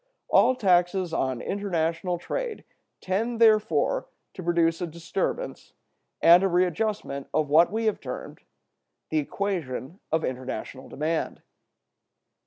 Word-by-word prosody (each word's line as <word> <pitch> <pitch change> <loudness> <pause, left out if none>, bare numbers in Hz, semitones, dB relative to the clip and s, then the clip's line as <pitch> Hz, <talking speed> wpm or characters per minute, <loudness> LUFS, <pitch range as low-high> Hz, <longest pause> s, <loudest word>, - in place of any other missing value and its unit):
All 260 - +5
taxes 180 -4 +2
on 130 -5 -1
international 175 -3 -1
trade 475 - -4 0.4
tend, 225 +5 -1
therefore, 225 - +3 0.3
to - - -8
produce 170 -1 +1
a 175 - -1
disturbance, 170 - -4 0.5
and 170 +2 +8
a 195 - +3
readjustment 180 -4 -1
of 150 -2 +1
what 165 +4 +5
we 225 +1 -1
have 215 - 0
termed 125 -2 -7 0.7
the 155 - +2
equation 165 -2 -3
of 160 0 +1
international 130 +1 -5
demand. 155 +3 -2
175 Hz, 115 wpm, -26 LUFS, 160-200 Hz, 0.7 s, and